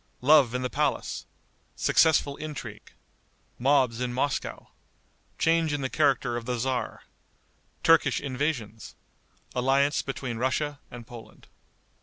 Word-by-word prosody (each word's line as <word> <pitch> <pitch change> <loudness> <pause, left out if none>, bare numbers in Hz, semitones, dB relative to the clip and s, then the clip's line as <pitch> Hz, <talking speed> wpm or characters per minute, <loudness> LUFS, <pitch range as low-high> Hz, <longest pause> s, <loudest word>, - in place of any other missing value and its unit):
Love 135 -3 +5
in 125 - -1
the - - 0
Palace. - - -1 0.5
Successful 150 -3 +3
Intrigue. 155 -2 -8 0.7
Mobs 130 -2 +2
in 125 -1 -1
Moscow. 135 +3 -3 0.7
Change 165 -2 +2
in 145 - -2
the 130 - -3
Character 135 -5 +2
of 115 - -6
the 125 0 -2
Tzar. 130 +1 -2 0.8
Turkish 160 -5 +4
Invasions. 130 -5 -3 0.6
Alliance 135 +3 +2
Between 135 -3 -5
Russia 140 +4 -1
and 120 -1 -10
Poland. 115 -2 -13
135 Hz, 115 wpm, -27 LUFS, 125-145 Hz, 0.8 s, Love